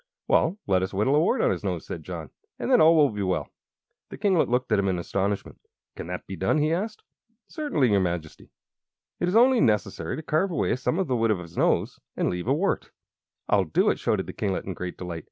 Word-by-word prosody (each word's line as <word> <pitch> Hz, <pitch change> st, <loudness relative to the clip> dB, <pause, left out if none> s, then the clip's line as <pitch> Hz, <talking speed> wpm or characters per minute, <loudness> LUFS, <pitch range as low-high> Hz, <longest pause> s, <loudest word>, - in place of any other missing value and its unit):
"Well, 170 Hz, +5 st, +2 dB
let 95 Hz, -2 st, +2 dB
us 95 Hz, +1 st, -3 dB
whittle 105 Hz, +8 st, +2 dB
a -, -, +5 dB
wart 180 Hz, +11 st, +2 dB
on -, -, +3 dB
his -, -, -3 dB
nose," -, -, -3 dB
said -, -, -6 dB
John, -, -, -7 dB, 0.3 s
"and -, -, -3 dB
then 250 Hz, -, +6 dB
all 165 Hz, +1 st, +7 dB
will 150 Hz, -3 st, +4 dB
be 105 Hz, -1 st, -4 dB
well." 95 Hz, -2 st, -1 dB, 0.6 s
The -, -, -8 dB
kinglet 195 Hz, -5 st, +2 dB
looked 125 Hz, 0 st, 0 dB
at 105 Hz, -, +4 dB
him 100 Hz, -, +1 dB
in 95 Hz, -2 st, 0 dB
astonishment. 100 Hz, +3 st, -2 dB, 0.4 s
"Can -, -, -7 dB
that 90 Hz, 0 st, -5 dB
be 95 Hz, -, -6 dB
done?" 95 Hz, -, +1 dB
he 155 Hz, +1 st, +2 dB
asked. 215 Hz, +5 st, -3 dB, 0.4 s
"Certainly, 160 Hz, -, 0 dB
your 100 Hz, -, +4 dB
Majesty. 85 Hz, -4 st, -4 dB, 0.7 s
It 175 Hz, -, 0 dB
is 180 Hz, -, 0 dB
only 245 Hz, +1 st, +5 dB
necessary 100 Hz, -6 st, 0 dB
to 160 Hz, -, -7 dB
carve 155 Hz, +6 st, +1 dB
away 170 Hz, -, 0 dB
some 130 Hz, +6 st, -1 dB
of 190 Hz, -, +1 dB
the 130 Hz, -, 0 dB
wood 115 Hz, -1 st, +1 dB
of 105 Hz, -, +2 dB
his 85 Hz, -2 st, -10 dB
nose, -, -, +1 dB, 0.2 s
and -, -, +1 dB
leave 90 Hz, +4 st, -4 dB
a 135 Hz, -, +3 dB
wart." 195 Hz, +6 st, -1 dB, 0.6 s
"I'll 100 Hz, -2 st, +3 dB
do 80 Hz, -, +2 dB
it!" -, -, -4 dB
shouted -, -, 0 dB
the -, -, -8 dB
kinglet, 95 Hz, -2 st, -2 dB
in 95 Hz, -, -4 dB
great 90 Hz, 0 st, -6 dB
delight. 90 Hz, -2 st, -5 dB
110 Hz, 235 wpm, -26 LUFS, -, 0.7 s, all